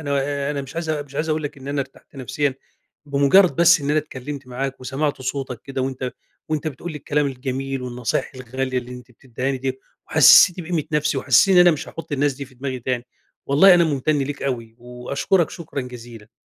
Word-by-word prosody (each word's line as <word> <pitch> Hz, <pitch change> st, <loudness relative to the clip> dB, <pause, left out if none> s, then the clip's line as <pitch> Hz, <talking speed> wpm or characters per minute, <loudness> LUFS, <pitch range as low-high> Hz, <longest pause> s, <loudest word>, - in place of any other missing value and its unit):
أنا 140 Hz, -1 st, -1 dB
أنا 140 Hz, -1 st, -3 dB
مش 135 Hz, +4 st, -11 dB
عايز 165 Hz, -1 st, -3 dB
مش 145 Hz, -2 st, -4 dB
عايز 155 Hz, +3 st, -2 dB
أقولك 150 Hz, -2 st, -2 dB
إن 135 Hz, +1 st, -9 dB
أنا 140 Hz, 0 st, -1 dB
أرتحت 135 Hz, +1 st, -10 dB
نفسيًا 135 Hz, +2 st, -1 dB, 0.5 s
بمُجرد 145 Hz, +7 st, +4 dB
بس 170 Hz, -1 st, +6 dB
إن 140 Hz, 0 st, -2 dB
أنا 155 Hz, -, +3 dB
اتكلمت 140 Hz, -2 st, -6 dB
معاك، 130 Hz, +2 st, -4 dB
وسمعت 135 Hz, +3 st, -2 dB
صوتك 130 Hz, -3 st, -4 dB
كده، 135 Hz, -1 st, -4 dB
وأنت 130 Hz, -1 st, -3 dB, 0.4 s
وأنت 155 Hz, 0 st, -1 dB
بتقول 160 Hz, +4 st, -7 dB
لي 150 Hz, -, -6 dB
الكلام 145 Hz, +1 st, 0 dB
الجميل، 135 Hz, 0 st, -4 dB
والنصايح 125 Hz, +1 st, -2 dB
الغالية 130 Hz, +1 st, -3 dB
اللي 125 Hz, 0 st, -8 dB
أنت 125 Hz, 0 st, -11 dB
بتديهني 130 Hz, +2 st, -4 dB
ديّة، 130 Hz, 0 st, -3 dB, 0.3 s
وحسِستني 180 Hz, -1 st, +7 dB
بقيمة 160 Hz, -3 st, -1 dB
نفسي، 150 Hz, -1 st, +1 dB
وحسيت 195 Hz, +7 st, +4 dB
إن 180 Hz, -, +8 dB
أنا 175 Hz, -, +7 dB
مش 155 Hz, -, -3 dB
هاحُطّ 165 Hz, -2 st, -9 dB
الناس 145 Hz, +1 st, +1 dB
دي 140 Hz, +1 st, -7 dB
في 130 Hz, -1 st, -18 dB
دماغي 130 Hz, 0 st, -4 dB
تاني، 125 Hz, 0 st, -2 dB, 0.4 s
والله 175 Hz, +7 st, +7 dB
أنا 170 Hz, -, +5 dB
مُمتن 150 Hz, 0 st, 0 dB
ليك 145 Hz, +1 st, -3 dB
أوي، 115 Hz, -4 st, -3 dB
وأشكرك 130 Hz, +8 st, -1 dB
شكرًا 160 Hz, -4 st, -6 dB
جزيلًا. 120 Hz, -3 st, -10 dB
140 Hz, 195 wpm, -22 LUFS, 130-150 Hz, 0.5 s, إن